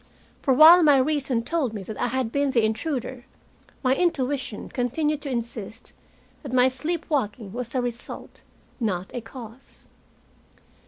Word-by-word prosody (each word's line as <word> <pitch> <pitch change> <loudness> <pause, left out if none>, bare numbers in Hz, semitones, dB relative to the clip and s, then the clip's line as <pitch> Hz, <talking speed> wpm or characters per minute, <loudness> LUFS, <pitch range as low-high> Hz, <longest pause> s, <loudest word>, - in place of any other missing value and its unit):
For 275 - +1
while 325 +5 +9
my 295 -4 +6
reason 270 -3 +1
told 265 -4 -1
me 200 - -5
that 215 +2 -7
I 245 - +2
had 250 -2 -1
been 280 +1 +1
the 235 -4 +3
intruder, 250 +2 -3 0.6
my 255 0 +4
intuition 270 -8 -1
continued 295 +4 -1
to 285 - -5
insist 235 -2 -5 0.5
that 280 - -7
my 255 0 +4
sleepwalking 260 - -3
was 245 +1 -5
a 255 - +1
result, 240 -1 -6 0.4
not 190 -6 -2
a 245 - -4
cause. 235 +1 -12
255 Hz, 145 wpm, -25 LUFS, 230-285 Hz, 0.6 s, while